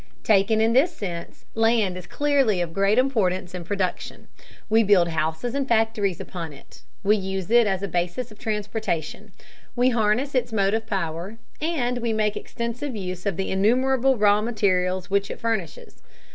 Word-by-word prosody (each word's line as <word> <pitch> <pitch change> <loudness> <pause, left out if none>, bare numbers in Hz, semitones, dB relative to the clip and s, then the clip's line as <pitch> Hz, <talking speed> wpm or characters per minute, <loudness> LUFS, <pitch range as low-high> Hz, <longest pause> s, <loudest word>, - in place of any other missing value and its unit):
Taken 215 +1 +3
in 225 +1 +3
this 280 +8 +4
sense, 180 - -7
land 225 -4 +2
is 180 -1 -8
clearly 275 -9 +1
of 170 -2 -2
great 195 +4 +2
importance 190 -9 +1
in 180 -1 -5
production. 185 0 -4 0.4
We 220 +1 +4
build 195 -5 +4
houses 160 +9 -2
and 275 -1 -1
factories 220 -5 +1
upon 165 -4 -6
it, 135 - -16 0.2
we 205 +2 +4
use 190 -1 -4
it 235 -2 +5
as 195 -1 -1
a - - -1
basis 180 +7 -2
of 215 - -15
transportation, 210 -7 -3 0.4
we 250 +1 +3
harness 240 +4 +1
its 245 -2 0
motive 220 +1 0
power, 185 +1 -3 0.2
and 255 -7 -1
we 235 -1 -1
make 215 -1 0
extensive 235 +3 -4
use 185 -1 -5
of 195 -4 -1
the 195 - -2
innumerable 255 +6 +2
raw 205 0 +4
materials 190 -5 0
which 200 0 +1
it - - -6
furnishes. 220 -8 -4
210 Hz, 165 wpm, -24 LUFS, 185-235 Hz, 0.4 s, it